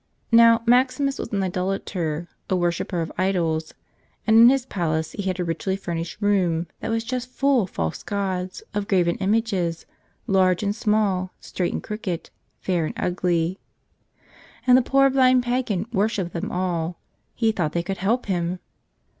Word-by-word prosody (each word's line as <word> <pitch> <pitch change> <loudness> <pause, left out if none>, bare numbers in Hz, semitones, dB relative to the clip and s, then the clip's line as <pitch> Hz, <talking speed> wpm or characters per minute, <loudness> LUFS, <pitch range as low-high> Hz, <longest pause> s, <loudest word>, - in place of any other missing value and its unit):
Now, 230 0 +6
Maximus 260 +3 +2
was - - -5
an 200 -2 0
idolater, 180 -3 -2 0.2
a 190 - +2
worshipper 175 0 -1
of 165 - -4
idols, 165 -4 0 0.5
and 220 - +4
in 230 +2 +9
his 265 -1 +2
palace 160 -8 -2
he - - -5
had 190 -2 -2
a - - +1
richly 170 +3 -2
furnished 170 -2 -5
room 185 -5 +1
that - - -4
was 225 0 0
just 250 +1 -4
full 275 -1 +2
of 190 - -4
false 80 - -3
gods, 190 -2 -3
of 205 -1 -2
graven 175 -3 +2
images, 195 -5 0 0.4
large 185 -1 +2
and 205 0 0
small, 210 -4 +1
straight 180 -2 -3
and - - -4
crooked, 200 -5 -5 0.3
fair 175 -4 -1
and - - -7
ugly. 175 0 0 1.1
And 250 -1 +7
the 255 - +6
poor 275 +2 +4
blind 255 -1 +4
pagan 240 -6 -1
worshipped 200 -4 0
them 170 - -3
all. 175 -2 -2 0.4
He 225 -2 +2
thought 165 -8 -2
they 170 - 0
could 195 +2 -4
help 225 +7 0
him! 180 -2 -1
190 Hz, 165 wpm, -23 LUFS, 175-225 Hz, 1.1 s, in